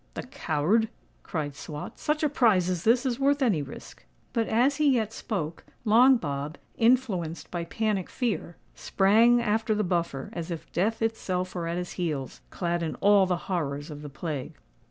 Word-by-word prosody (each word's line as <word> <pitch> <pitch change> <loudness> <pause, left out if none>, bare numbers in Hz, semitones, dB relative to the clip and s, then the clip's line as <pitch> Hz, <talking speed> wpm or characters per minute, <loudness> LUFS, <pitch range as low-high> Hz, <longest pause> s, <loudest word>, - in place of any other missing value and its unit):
"The - - -4
coward!" 205 - +1 0.3
cried 145 -4 -4
Swot: 150 0 -8
"such 300 0 0
a 300 - +3
prize 210 - +3
as 175 -2 -3
this 240 +4 +4
is 250 -1 -1
worth 280 +1 +2
any 200 - +2
risk." 140 - -10 0.3
But 230 -1 +1
as 250 +6 +2
he 290 -4 +4
yet 220 -2 -1
spoke, 165 -10 -4 0.2
Long 245 +5 +6
Bob, 145 -3 -4 0.2
influenced 225 -9 +1
by 170 -1 -3
panic 210 0 -1
fear, 225 -8 -2 0.2
sprang 225 +5 +4
after 220 0 +1
the 210 - +1
Buffer, 170 -7 -2
as 170 0 -5
if 170 -2 -6
Death 225 +5 0
itself 185 -5 -2
were 170 -2 -3
at 170 +1 -2
his 180 0 -4
heels, 150 -7 -3
clad 175 -1 -2
in 160 -2 -2
all 200 -1 +4
the 180 -1 +1
horrors 145 -5 -2
of 145 0 -8
the 150 - -7
plague. 140 -1 -5
185 Hz, 175 wpm, -27 LUFS, 165-230 Hz, 0.3 s, Long